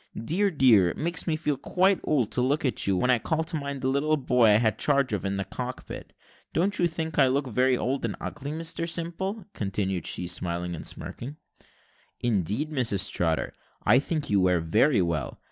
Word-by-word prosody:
Dear, 175 - 0
dear, 120 - +5
it - - -6
makes 170 +2 -1
me 160 - +1
feel 150 -3 -1
quite 185 +7 +2
old 130 -8 +1
to 125 - +1
look 140 +4 +1
at 130 - -1
you, 95 -2 +2
when 125 +7 +2
I 125 - +3
call 160 +6 -1
to 165 +1 -3
mind 140 -2 -4
the 130 - -1
little 145 +3 +1
boy 125 -4 +3
whom 105 - +6
I - - +4
had 110 -2 0
charge 140 -5 +2
of 105 - -2
in 100 0 -2
the 100 - -1
cockpit. 125 +5 -7 0.4
Don't 185 +5 +1
you 175 - +4
think 160 -2 -3
I 135 - +6
look 135 +2 0
very 125 +1 +2
old 135 +3 -2
and - - -2
ugly, 140 -1 -6
Mr 165 +2 -2
Simple?" 180 +5 -3
continued 95 -3 -2
she, 90 - -2
smiling 90 0 -2
and 80 - -3
smirking. 135 +5 -5 0.8
"Indeed, 115 - -1
Mrs 115 -9 +1
Trotter, 80 -2 -1 0.3
I 120 +5 +5
think 150 +1 -2
you 100 -2 +4
wear 90 -1 +3
very 100 - +3
well. 80 -5 -3
130 Hz, 205 wpm, -26 LUFS, 100-155 Hz, 0.8 s, whom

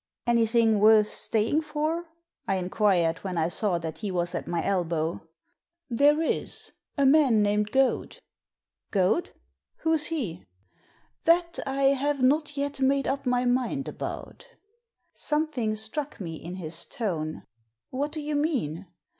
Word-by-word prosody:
"Anything 230 -2 +3
worth 215 0 +6
staying 225 +8 0
for?" 310 +2 -2 0.4
I 195 - +1
inquired, 180 -2 +1
when 185 -2 -4
I 165 0 +1
saw 190 -1 0
that 165 -2 -6
he 210 - -3
was 175 -1 -1
at - - -4
my 170 -1 -1
elbow. 165 -3 -1 0.6
There 290 +6 +4
is. - - -2 0.3
A 280 - +3
man 265 -7 +5
named 210 0 +1
Goad." 265 +1 +1 0.7
"Goad! 200 - +1 0.5
Who's 320 -2 +2
he?" 245 - -3 0.8
That 340 +1 +3
I 270 0 +3
have 280 +1 -1
not 295 +3 +2
yet 280 0 -2
made 275 0 +2
up 275 -1 -2
my 250 0 +2
mind 255 +2 0
about" - - -6 0.7
Something 300 -8 -1
struck 245 +8 -4
me 170 -5 -5
in 170 +3 -7
his 165 -3 -5
tone. 165 - -3 0.2
" 115 +1 -55
What 285 +3 -2
do 310 - -4
you 295 0 -2
mean 230 - -1
235 Hz, 140 wpm, -27 LUFS, 185-290 Hz, 0.8 s, worth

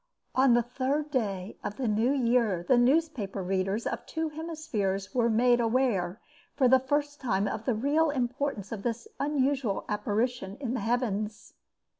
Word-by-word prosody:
On 260 -2 +5
the 240 - +3
third 275 +5 -2
day 200 -7 -2
of 205 - -4
the 255 - -1
new 220 +4 +2
year 235 -9 +2
the 255 - +5
newspaper 245 - +1
readers 195 +4 -1
of 235 +1 -3
two 320 0 -2
hemispheres 300 - -3
were 240 -2 +2
made 240 +2 +4
aware 225 -6 +1 0.4
for 260 - +4
the 260 +1 +6
first 290 +2 -1
time 205 -5 +1
of 220 - -4
the 250 - +1
real 295 +7 +2
importance 255 -5 -2
of 220 -3 -4
this 235 0 -3
unusual 275 -6 0
apparition 210 0 -1
in 250 -4 -3
the 255 - -1
heavens. 215 -2 -2
240 Hz, 160 wpm, -29 LUFS, 210-270 Hz, 0.4 s, the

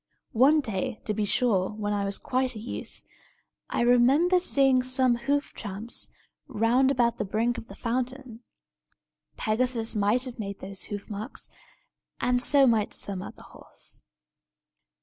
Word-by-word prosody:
One 280 +7 +5
day, 230 0 -3
to 215 - 0
be 210 0 -1
sure, 200 -4 +2
when 210 -1 -3
I 200 -1 0
was 200 0 -1
quite 255 -1 -1
a - - -6
youth, 225 - -8 0.7
I - - -1
remember 265 +10 +4
seeing 270 -7 +3
some 255 0 +2
hoof 280 +5 -1
tramps 210 +2 -4 0.4
round 245 +2 +2
about 240 -4 +1
the - - +1
brink 225 +4 0
of - - -13
the - - -11
fountain. 255 0 -3 1.0
Pegasus 230 0 0
might 210 +4 +2
have 255 -2 -7
made 200 -2 -4
those 195 0 -6
hoof 205 -1 -6
marks; 215 +4 -6 0.7
and 245 0 +1
so 275 +1 +5
might 225 -4 +2
some 195 -2 -1
other - - -10
horse." - - -10
235 Hz, 150 wpm, -27 LUFS, 210-255 Hz, 1.0 s, One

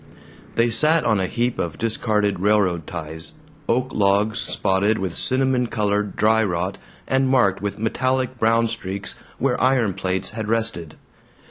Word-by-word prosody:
They 115 0 +2
sat 155 +7 +3
on 110 -4 +2
a 95 - 0
heap 120 +3 -1
of 85 - -3
discarded 105 -3 0
railroad 95 -5 +1
ties, 80 -1 -7 0.4
oak 125 +2 +1
logs 100 +1 +2
spotted 100 +3 +1
with 95 -3 -3
cinnamon 130 -1 +1
colored 105 -2 -1
dry 110 +1 +3
rot 90 0 -2 0.3
and 135 0 +2
marked 110 -9 +3
with 100 0 -3
metallic 130 +3 -1
brown 115 +1 +3
streaks 100 -3 -4 0.2
where 130 -1 0
iron 125 -6 +2
plates 95 0 -2
had 110 -1 -5
rested. 110 -8 -2
110 Hz, 145 wpm, -22 LUFS, 95-120 Hz, 0.4 s, sat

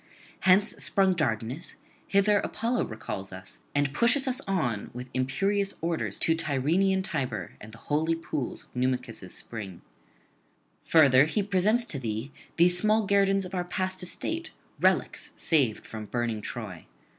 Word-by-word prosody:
Hence 190 +3 +5
sprung 195 -2 +3
Dardanus: 130 -1 -2 0.3
hither 200 +1 +4
Apollo 235 +5 -1
recalls 95 -3 -6
us, 95 0 -9 0.2
and 145 -1 +1
pushes 250 - +3
us 260 +1 0
on 135 - -1
with 125 +1 -7
imperious 195 +10 0
orders 165 0 -2
to 165 - +3
Tyrrhenian 165 +6 +1
Tiber 135 - -3
and 110 - -10
the 115 - -12
holy 155 +6 0
pools 155 -5 -4
of - - -28
Numicus' 125 -6 -2
spring. 100 -6 -7 1.0
Further, 140 -4 +6
he 200 +6 0
presents 205 +5 +2
to 145 - -2
thee 115 +2 -4 0.3
these 180 +1 +5
small 215 +2 +3
guerdons 195 -1 +3
of 180 - -9
our 180 -1 0
past 185 +1 -2
estate, 325 - -3 0.3
relics - - +1
saved 135 -10 +1
from 110 -1 -7
burning 120 -2 -2
Troy. 105 -7 -7
160 Hz, 145 wpm, -28 LUFS, 125-195 Hz, 1.0 s, Further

